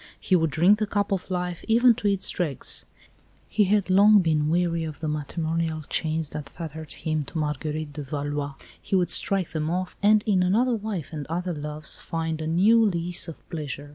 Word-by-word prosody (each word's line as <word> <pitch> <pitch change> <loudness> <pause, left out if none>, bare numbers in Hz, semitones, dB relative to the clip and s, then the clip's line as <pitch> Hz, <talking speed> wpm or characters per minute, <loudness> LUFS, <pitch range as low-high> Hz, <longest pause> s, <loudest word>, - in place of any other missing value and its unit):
He 185 - +2
would 165 -2 +2
drink 180 +8 +4
the 215 - 0
cup 205 0 -1
of 195 -1 -2
life, 180 -2 -3
even 235 +2 +5
to 220 -2 -2
its 195 -1 +1
dregs. 155 -8 -2 0.6
He 210 -1 +2
had 205 0 +2
long 205 +3 +7
been 155 -5 +2
weary 170 0 +1
of 155 -2 -6
the 155 - -3
matrimonial 160 +1 -2
chains 160 -1 -1
that 145 -2 -6
fettered 160 -2 -8
him 155 -1 -2
to 160 - -7
Marguerite 150 0 -3
of 140 -3 -7
Valois. 145 -1 -3 0.3
He - - -2
would 175 -2 +2
strike 195 -1 +3
them 155 0 -2
off, 180 +1 -2
and 210 +1 +5
in 195 -4 +3
another 225 +8 +2
wife 205 -8 -4
and 150 -3 -5
other 175 +3 -2
loves 150 0 -3
find 160 -1 -3
a 155 - -3
new 205 +8 +4
lease 175 -4 -1
of 165 - -10
pleasure. 145 -3 -5
165 Hz, 195 wpm, -25 LUFS, 155-195 Hz, 0.6 s, long